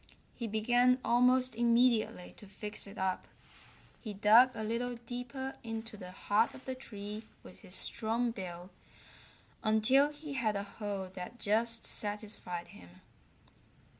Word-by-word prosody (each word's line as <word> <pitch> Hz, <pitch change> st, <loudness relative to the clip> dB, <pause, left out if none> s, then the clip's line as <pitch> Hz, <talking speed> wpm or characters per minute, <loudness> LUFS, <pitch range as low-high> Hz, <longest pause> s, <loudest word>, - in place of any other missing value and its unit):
He 235 Hz, -, -5 dB
began 245 Hz, +4 st, +3 dB
almost 250 Hz, +1 st, +4 dB
immediately 235 Hz, -4 st, +2 dB
to 205 Hz, -, -13 dB
fix 210 Hz, +1 st, -3 dB
it 200 Hz, -, -11 dB
up. 190 Hz, -1 st, -2 dB, 0.7 s
He 215 Hz, -4 st, -6 dB
dug 220 Hz, +6 st, +7 dB
a 220 Hz, -, -4 dB
little 240 Hz, +3 st, -2 dB
deeper 245 Hz, +3 st, -6 dB
into 225 Hz, -1 st, -6 dB
the 185 Hz, -3 st, -9 dB
heart 205 Hz, +4 st, +1 dB
of 265 Hz, -, -13 dB
the 260 Hz, -, -3 dB
tree 210 Hz, -4 st, -8 dB, 0.2 s
with -, -, -13 dB
his -, -, -4 dB
strong 230 Hz, +2 st, +1 dB
bill 180 Hz, -4 st, -8 dB, 0.9 s
until 230 Hz, +7 st, +5 dB
he 295 Hz, 0 st, -8 dB
had 225 Hz, -6 st, 0 dB
a 200 Hz, -, -2 dB
hole 200 Hz, -2 st, -5 dB
that 185 Hz, +5 st, -8 dB
just 225 Hz, +2 st, +2 dB
satisfied 205 Hz, -4 st, -2 dB
him. 90 Hz, +1 st, -15 dB
220 Hz, 135 wpm, -32 LUFS, 205-245 Hz, 0.9 s, dug